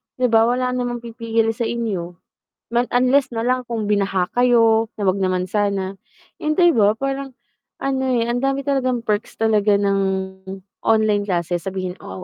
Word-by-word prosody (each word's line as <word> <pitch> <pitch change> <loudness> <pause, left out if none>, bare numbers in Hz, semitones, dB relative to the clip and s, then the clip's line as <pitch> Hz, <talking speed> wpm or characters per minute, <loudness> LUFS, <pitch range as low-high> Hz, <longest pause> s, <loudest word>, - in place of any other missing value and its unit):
Di 250 -2 0
ba 225 0 +5
wala 250 +1 0
namang 245 -1 -3
pipigil 230 -1 -1
sa 230 +1 -3
inyo, 195 -7 -3 0.6
mas 240 +1 +1
unless 255 +2 +3
nalang 250 +2 0
kung 220 -3 -2
binaha 195 -3 0
kayo, 230 -2 +4
na 210 - -5
wag 195 0 +1
naman 185 -1 0
sana, 195 -2 -1 0.4
yung 305 0 -1
di 345 -1 +5
ba 210 -4 +3
parang, 270 +1 -4 0.5
ano 265 -1 0
eh, 245 -3 +1
ang 245 - -1
dami 275 +1 -1
talagang 255 -4 0
perks 210 -1 -2
talaga 215 -2 +2
ng 200 -1 +1 0.9
online 215 -2 +2
classes, 175 -1 -1
sabihin 185 -1 -4
ko, 95 0 -8
225 Hz, 160 wpm, -21 LUFS, 200-250 Hz, 0.9 s, ba